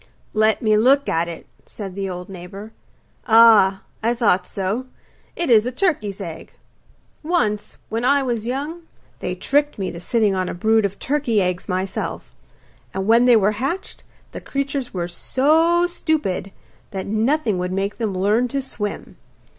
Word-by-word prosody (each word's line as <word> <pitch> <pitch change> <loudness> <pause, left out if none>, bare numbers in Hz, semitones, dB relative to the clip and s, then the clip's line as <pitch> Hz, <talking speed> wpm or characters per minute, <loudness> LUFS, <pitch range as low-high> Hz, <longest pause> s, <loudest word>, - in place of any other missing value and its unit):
'Let 215 +1 +2
me 215 -1 +4
look 270 +6 +4
at 165 +1 0
it,' 170 -1 -8 0.2
said 195 -3 -7
the 195 0 -3
old 180 0 -6
neighbour. 195 +3 -9 0.6
'Ah, 220 -4 +6 0.2
I 230 +2 +1
thought 195 -6 +2
so; 205 +7 -3 0.5
it 340 -7 -1
is 225 0 +5
a - - -2
turkey's 250 - -1
egg. 165 -4 -8 0.7
Once, 255 - -1
when 225 +2 -2
I 280 +2 +3
was 235 -3 -2
young, 290 +7 -3 0.4
they - - -3
tricked 290 +1 +1
me 190 -2 -3
to 170 - -8
sitting 215 +2 +1
on 185 -1 -1
a - - -5
brood 220 +3 +2
of 200 0 -3
turkey's 250 -8 0
eggs 180 +2 -3
myself, 185 +1 -3 0.6
and 190 0 -2
when 230 +3 +5
they 245 -1 +6
were 210 -1 +4
hatched 345 +9 -3 0.3
the - - -7
creatures 275 -2 -3
were 175 -2 -3
so 320 - +2
stupid 305 - -2 0.4
that 190 -1 -5
nothing 220 0 +1
would 180 0 -2
make 195 +3 -2
them 215 -4 -1
learn 210 +6 +2
to 275 +3 -2
swim. 210 -5 -6
220 Hz, 160 wpm, -21 LUFS, 195-265 Hz, 0.7 s, Ah